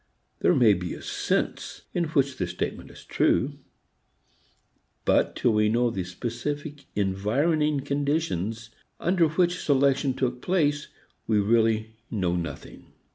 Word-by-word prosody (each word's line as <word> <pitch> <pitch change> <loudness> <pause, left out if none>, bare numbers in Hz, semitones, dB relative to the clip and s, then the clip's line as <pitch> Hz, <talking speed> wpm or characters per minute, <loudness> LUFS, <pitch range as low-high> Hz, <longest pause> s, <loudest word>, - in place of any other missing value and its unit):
There 180 - +3
may 120 -6 +6
be 90 -2 -4
a - - -10
sense - - -2
in 175 - +1
which 140 -4 0
the 90 - -1
statement 85 +1 -4
is - - -14
true; 140 +2 +1 1.5
but - - +2
till 120 - +2
we 105 0 +3
know 120 +2 +2
the 95 -4 -3
specific 140 - -5
environing 135 - +1
conditions 135 - -2 0.3
under 175 -2 +3
which 175 +3 +1
selection 140 -1 +2
took 125 -1 -2
place 150 -5 +1 0.4
we 110 - +2
really 110 +1 +2 0.2
know 90 -5 0
nothing. 85 -1 -6
125 Hz, 130 wpm, -26 LUFS, 105-145 Hz, 1.5 s, may